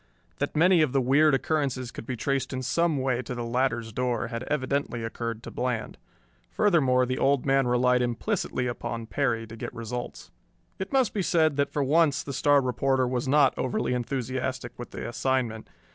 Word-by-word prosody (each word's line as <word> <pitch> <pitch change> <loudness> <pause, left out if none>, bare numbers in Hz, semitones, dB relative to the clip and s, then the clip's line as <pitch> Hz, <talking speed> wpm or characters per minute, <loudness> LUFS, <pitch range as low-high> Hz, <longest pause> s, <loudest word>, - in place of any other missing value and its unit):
That - - -2
many 175 +2 +5
of 145 -4 +1
the 135 - +3
weird 140 +3 +4
occurrences 135 -4 -1
could 115 - -9
be 130 - -2
traced 135 +2 -1
in 130 0 -3
some 165 +3 +1
way 130 -2 0
to 125 0 -6
the 120 - -4
latter's 115 -2 -1
door 125 -2 -1
had 115 -1 -4
evidently 140 -4 -1
occurred 115 0 -4
to - - -8
Bland. 125 -3 -3 0.5
Furthermore, 140 -12 +3
the 130 +1 -2
Old 140 -1 +2
Man 135 -1 +3
relied 125 0 +3
implicitly 125 - -1
upon 120 -1 -4
Perry 115 -2 -1
to 115 0 -10
get 115 - -6
results. 120 +1 -6 0.5
It 190 - -4
must 265 -5 +2
be 205 - 0
said 160 -4 +2
that 140 - +1
for 145 - 0
once 145 -1 +3
the 140 - -6
star 145 +2 +4
reporter 130 +1 +1
was 125 0 -2
not 140 -1 +4
overly 125 0 -1
enthusiastic 130 +1 -3
with 120 - -7
the - - -6
assignment. 120 -2 -1
130 Hz, 185 wpm, -27 LUFS, 120-140 Hz, 0.5 s, many